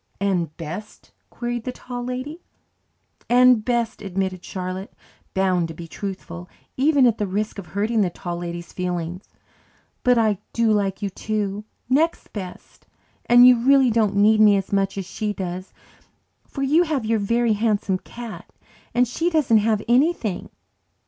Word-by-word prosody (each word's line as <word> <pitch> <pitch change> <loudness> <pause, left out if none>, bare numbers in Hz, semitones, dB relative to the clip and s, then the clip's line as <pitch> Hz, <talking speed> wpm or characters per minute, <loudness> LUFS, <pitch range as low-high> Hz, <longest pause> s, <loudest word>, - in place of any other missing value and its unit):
"And 180 -6 -1
best?" 180 +7 -8 0.2
queried 240 -1 -4
the 255 - -3
Tall 245 -1 -7
Lady. 255 +7 -5 0.9
"And 250 -2 +5
best," 235 -1 -1
admitted 190 -1 -3
Charlotte, 185 +1 -5 0.4
bound 185 -3 +2
to 165 - -9
be 165 +1 -8
truthful, 180 -2 -7 0.3
even 280 0 +4
at 230 -2 +2
the 205 - 0
risk 210 +2 -2
of 185 - -9
hurting 210 +6 0
the 190 - +2
Tall 175 0 -6
Lady's 170 0 -6
feelings. 180 0 -3 0.8
"But 250 -1 +3
I 215 -4 +2
do 230 -1 +2
like 200 -1 0
you, 200 - -2
too 210 0 -3 0.2
next 305 +6 +1
best. 185 -4 -9 0.4
And 245 +1 +8
you 250 -2 +6
really 265 0 +5
don't 215 -3 +2
need 215 +2 +5
me 205 -2 +6
as 195 +1 -4
much 195 0 +1
as 195 - -3
she 210 +3 -3
does, 185 -1 -5 0.8
for 275 - -4
you 300 +5 +4
have 305 -9 -1
your 225 0 +1
Very 230 +2 +2
Handsome 205 -3 0
Cat 235 +1 -9 0.4
and 250 +1 +4
she 330 +8 -1
hasn't 225 -9 +2
anything." 245 - +1
210 Hz, 155 wpm, -23 LUFS, 190-240 Hz, 0.9 s, And